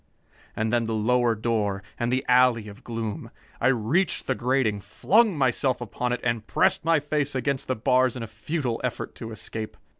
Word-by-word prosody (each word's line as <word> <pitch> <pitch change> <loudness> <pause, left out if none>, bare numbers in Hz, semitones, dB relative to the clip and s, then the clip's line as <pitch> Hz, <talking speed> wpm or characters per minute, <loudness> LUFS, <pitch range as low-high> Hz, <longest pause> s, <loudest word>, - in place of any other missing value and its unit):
And 110 +1 -1
then 120 -1 +2
the 115 - -1
lower 120 +1 +2
door, 105 -3 -1 0.2
and 120 0 0
the 130 +1 0
alley 125 -3 +4
of 105 0 -12
gloom. 115 -3 -4 0.3
I 125 - +2
reached 135 - +1
the 130 - +1
grating, 125 -4 0
flung 190 - +2
myself 130 -1 +1
upon 120 +1 -3
it 125 - -2
and 115 -2 -1
pressed 190 +1 +2
my 165 -1 +3
face 145 -1 -2
against 130 +1 -1
the 130 - 0
bars 130 +2 +2
in 125 - -5
a - - -3
futile 120 +3 -3
effort - - -3
to 115 - -8
escape. 110 0 -6
120 Hz, 185 wpm, -25 LUFS, 110-130 Hz, 0.3 s, alley